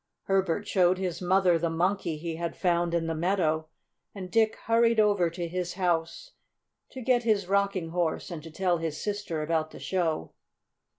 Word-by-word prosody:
Herbert 195 +1 0
showed 185 -2 +3
his 180 -2 -3
mother 180 -1 +3
the 170 0 0
Monkey 170 0 0
he 165 +1 -4
had 170 0 -4
found 175 -1 +1
in 165 -1 0
the 165 - -1
meadow, 160 -2 0 0.5
and 185 -2 -7
Dick 220 -1 +3
hurried 230 0 +3
over 205 -5 +3
to 170 +1 -4
his 180 0 -3
house 175 - -1 0.6
to 260 - -8
get 250 0 +3
his 215 -4 +1
Rocking 195 -3 0
Horse, 170 +1 -1
and 165 -3 -5
to 165 - -10
tell 175 +1 0
his 160 -2 -3
sister 205 -7 -3
about 155 0 0
the - - -12
show. 165 - -1
175 Hz, 175 wpm, -28 LUFS, 165-200 Hz, 0.6 s, showed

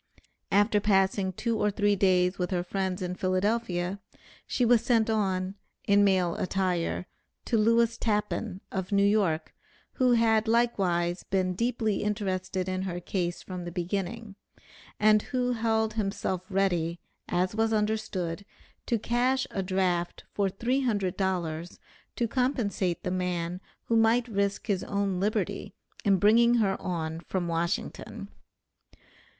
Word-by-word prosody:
After 205 +1 +4
passing 195 -1 +2
two 230 +3 -2
or 210 - +2
three 205 0 +2
days 185 -1 +2
with 180 - -1
her 185 - 0
new 175 - -1
friends 190 0 -2
in 180 0 -2
Philadelphia, 185 0 -1 0.5
she 250 - +1
was 235 -1 +5
sent 230 -2 +2
on 190 -3 0 0.3
(in 205 0 +5
male 185 -4 +3
attire) 180 -2 -1 0.4
to - - 0
Lewis 230 +1 +3
Tappan, 210 -2 -1
of 190 0 -3
New 200 0 +4
York, 195 -7 +1 0.4
who 250 -1 +4
had 225 -1 +3
likewise 190 -7 +1
been 185 -1 0
deeply 225 0 0
interested 190 -3 -2
in 185 0 -2
her 180 -2 -3
case 175 -1 -3
from 180 -1 -6
the 175 - -6
beginning, 195 +5 -3 0.7
and 215 0 +5
who 250 +1 -1
held 220 -2 +1
himself 195 -3 -2
ready, 175 -4 0 0.3
as 180 +2 0
was 225 +1 +1
understood, 210 -5 -1 0.4
to 235 - +2
cash 250 +4 +1
a 195 - -2
draft 185 -2 -1
for 200 -1 +1
three 240 +8 0
hundred 205 -8 0
dollars 175 -3 -2 0.4
to 235 - 0
compensate 225 -8 -1
the 180 - -2
man 180 -1 -2 0.2
who 230 - 0
might 225 +2 +4
risk 200 -2 -1
his 200 -5 0
own 200 -2 -1
liberty 205 +3 -2 0.3
in 200 -2 +4
bringing 235 +5 +5
her 200 -5 +2
on 165 -2 -3
from 175 +1 -3
Washington. 170 +3 -3
195 Hz, 140 wpm, -28 LUFS, 180-220 Hz, 0.7 s, was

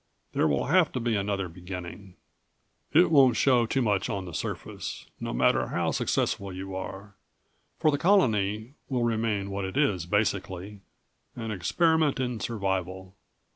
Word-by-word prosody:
There - - +2
will 70 -2 +1
have 170 +2 +3
to 130 - -1
be 115 -1 0
another 100 -1 -1
beginning. 90 +2 -8 0.8
It 165 +3 +5
won't 130 -6 +6
show 125 -4 +4
too 130 +2 +1
much 100 -1 +1
on 100 -4 -3
the 90 - -8
surface. - - -5
No - - -4
matter - - +2
how - - -1
successful 100 -1 -1
you 95 +1 -6
are, 95 +2 -7 0.6
for 155 -2 +3
the 145 - -1
colony 110 - +2 0.2
will 125 -3 0
remain 110 -4 0
what 100 0 -3
it 95 +6 -4
is 100 - +1
basically 100 0 -1 0.6
an 115 -2 -4
experiment 155 - +2
in 125 -3 -2
survival. 95 -4 -3
105 Hz, 150 wpm, -27 LUFS, 95-125 Hz, 0.8 s, won't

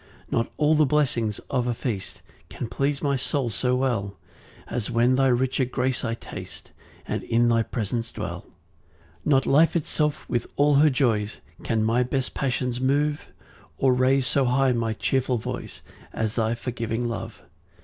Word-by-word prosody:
4 - - +2
Not 115 - -2
all 150 +1 +3
the 155 0 +5
blessings 125 -7 +1
of 125 -2 +1
a 120 - 0
feast 110 -6 -4 0.3
Can 120 - -5
please 140 +5 -1
my 140 -1 +2
soul 130 -2 -1
so 125 +3 0
well, 110 -7 -1 0.5
As 115 -4 -3
when 120 +1 +3
thy 135 +1 +3
richer 130 +1 +2
grace 130 0 -1
I 115 -1 -1
taste, - - -9 0.3
And - - -2
in 120 +1 +2
thy 115 -1 +3
presence 115 +1 -3
dwell. - - -5
5 - - -25 0.7
Not 135 -3 +3
life 155 +5 +4
itself 150 -2 0
with 120 -1 -1
all 145 +1 +4
her 150 +2 +6
joys, 115 -6 0 0.2
Can 110 -1 0
my 115 +3 +2
best 130 +1 -1
passions 125 -2 -1
move, 145 +3 0 0.5
Or 130 -1 +3
raise 130 +1 +3
so 130 +3 +2
high 130 +1 +3
my 115 -2 0
cheerful 130 +2 0
voice 110 - -6 0.3
As 110 -1 -1
thy 115 0 0
forgiving 120 -1 -3
love. 115 -1 -6
125 Hz, 170 wpm, -25 LUFS, 115-135 Hz, 0.7 s, her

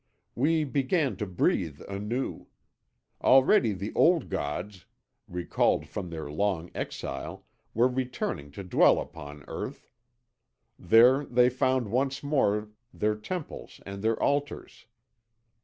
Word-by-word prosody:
We 155 +5 +2
began 140 - 0
to 105 - -3
breathe 85 -4 0
anew. 105 +6 -4 0.8
Already 130 - +5
the 100 +3 -5
old 170 -1 +3
gods, 90 +3 -4 0.4
recalled 90 -1 0
from 90 - -5
their 80 -3 -6
long 90 0 -1
exile, - - -5 0.3
were 120 +3 +5
returning 125 - -3
to 100 - -7
dwell 90 - +4
upon 75 -2 -9
earth. - - -7 0.9
There 120 +9 +6
they 125 0 +4
found 130 -3 0
once 135 +3 0
more 105 -8 +1 0.2
their 105 -3 0
temples 155 +10 -7
and 100 0 -7
their 110 +1 +1
altars. 140 -4 -2
115 Hz, 115 wpm, -28 LUFS, 95-130 Hz, 0.9 s, There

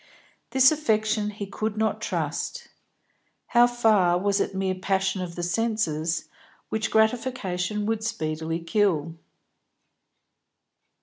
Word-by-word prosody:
This 265 +1 +6
affection 220 -7 +1
he 205 -1 -6
could 215 +2 -4
not 220 0 0
trust. 485 -1 -3 0.8
How 240 0 +6
far 215 -7 +3
was 200 +2 +1
it 195 - -1
mere 190 0 0
passion 190 0 -1
of 175 -2 -6
the 175 - -4
senses, 175 -5 -1 0.4
which 220 -2 -1
gratification 220 -4 0
would 220 0 -1
speedily 160 -6 -3
kill? 165 -3 +1
205 Hz, 110 wpm, -25 LUFS, 180-220 Hz, 0.8 s, This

